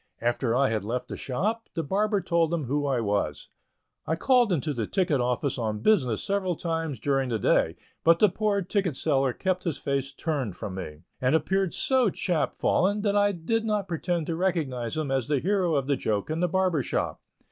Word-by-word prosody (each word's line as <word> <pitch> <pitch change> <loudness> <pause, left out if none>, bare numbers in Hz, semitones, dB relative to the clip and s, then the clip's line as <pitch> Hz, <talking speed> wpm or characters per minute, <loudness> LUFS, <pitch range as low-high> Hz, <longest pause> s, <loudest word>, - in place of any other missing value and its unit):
After 120 0 0
I 135 +1 +3
had 110 -3 -1
left 125 +4 -3
the - - -4
shop, 210 - -2
the 165 - -1
barber 205 +6 +1
told 170 -2 +1
him 170 -3 -1
who 145 +3 -1
I 135 -3 +1
was. 100 -9 -1 0.6
I 160 - +1
called 245 +4 +3
into 155 -3 0
the 115 -5 -2
ticket 170 -8 +1
office 125 +2 -1
on 110 -2 -2
business 130 - +2
several 195 -3 0
times 165 -6 -3
during 135 +1 0
the 115 - 0
day, 105 - +2 0.3
but 165 0 +6
the 210 - +6
poor 200 +1 0
ticket 185 -4 -1
seller 135 -3 +1
kept 185 +6 -1
his 165 -5 -2
face 140 -1 -2
turned 135 - -3
from 105 -4 -6
me, 80 -4 -7 0.2
and 130 +4 +3
appeared 190 +3 +1
so 260 -4 +3
chap 170 -3 -1
fallen 205 +3 +1
that 205 -1 +1
I 205 0 +4
did 205 +6 -1
not 210 -3 -1
pretend 170 -1 -1
to 165 - -2
recognize 155 -10 -1
him 150 -3 -2
as 135 -2 0
the 145 -1 +2
hero 180 +1 +1
of 140 -2 +1
the 140 -1 +1
joke 110 +3 -1
in 160 - -1
the 180 - +2
barber's 180 -6 +1
shop. - - -2
160 Hz, 205 wpm, -27 LUFS, 130-190 Hz, 0.6 s, but